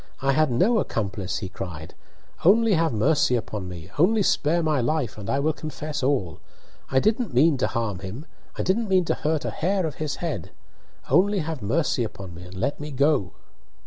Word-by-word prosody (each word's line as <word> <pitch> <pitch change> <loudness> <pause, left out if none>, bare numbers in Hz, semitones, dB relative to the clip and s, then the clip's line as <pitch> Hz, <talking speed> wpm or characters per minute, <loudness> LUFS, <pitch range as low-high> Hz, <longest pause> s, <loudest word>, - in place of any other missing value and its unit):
"I 135 +1 +2
had 155 +2 +3
no 195 - +3
accomplice!" 100 - -2
he 95 - -4
cried, 85 -5 -7 0.5
"Only 220 +4 +5
have 165 -2 +2
mercy 125 +3 +2
upon 105 -5 -4
me 90 +1 -9
only 210 +6 +4
spare 165 0 +2
my 155 -4 +1
life, 125 -2 -1
and 105 -2 -7
I 135 - +1
will 155 +3 +1
confess 155 -1 -5
all! 125 - 0 0.5
I 130 - +3
didn't 220 - 0
mean 150 +4 +5
to 130 - +1
harm 115 -6 -2
him! 100 +10 -7 0.3
I - - -1
didn't 210 +3 0
mean 185 -2 +3
to - - +1
hurt 155 0 -1
a - - -1
hair 190 +2 0
of 155 -4 -4
his 150 -2 -1
head! 155 - -4 0.6
Only 195 +7 +4
have 160 -5 -3
mercy 125 +4 +1
upon 100 -5 -7
me, 85 - -10
and 90 +1 -11
let 95 +10 -2
me 150 0 -5
go!" 140 - +1
145 Hz, 195 wpm, -25 LUFS, 105-165 Hz, 0.6 s, Only